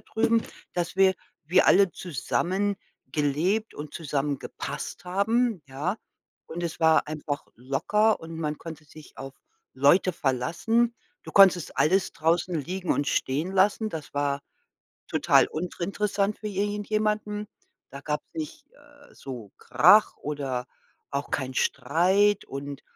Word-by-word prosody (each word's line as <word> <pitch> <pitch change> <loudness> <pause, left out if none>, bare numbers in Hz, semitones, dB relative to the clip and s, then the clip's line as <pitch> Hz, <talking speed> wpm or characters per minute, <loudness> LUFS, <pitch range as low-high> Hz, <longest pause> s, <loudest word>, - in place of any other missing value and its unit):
drüben“, 225 0 +1 0.3
dass 175 +1 -2
wir 190 -1 +5 0.3
wir 180 +5 +4
alle 195 -2 +5
zusammengelebt 175 - -2
und 150 0 -8
zusammengepasst 145 -1 -4
haben, 205 +2 +1
ja? 150 +10 -3 0.5
Und 170 +2 -6
es 170 0 -5
war 160 -1 +4
einfach 150 -1 -4
locker 210 - +1
und 165 0 -8
man 150 -2 -2
konnte 160 -2 -9
sich 150 0 -15
auf 135 0 -8 0.4
Leute 145 +8 +4
verlassen. 170 - 0 0.3
Du - - -10
konntest 190 -4 +5
alles 175 +7 +3
draußen 170 +3 +1
liegen 180 +4 -2
und 145 - -1
stehen 150 +8 -1
lassen. 205 +3 +2
Das 155 -5 -7
war 140 0 0 0.7
total - - +4
uninteressant 200 +4 -2
für 215 - -5
i 195 - -6
irgendjemanden. 210 0 -1 0.4
Da - - -8
gab's - - -3
nicht, 310 -2 -6
äh, 290 0 -20
so 120 -7 -9
Krach 210 0 +5
oder 135 -4 -3 0.4
auch 140 +1 -3
keinen 130 -1 -2
Streit 190 +11 +2
und 140 0 -7
175 Hz, 125 wpm, -26 LUFS, 145-205 Hz, 0.7 s, wir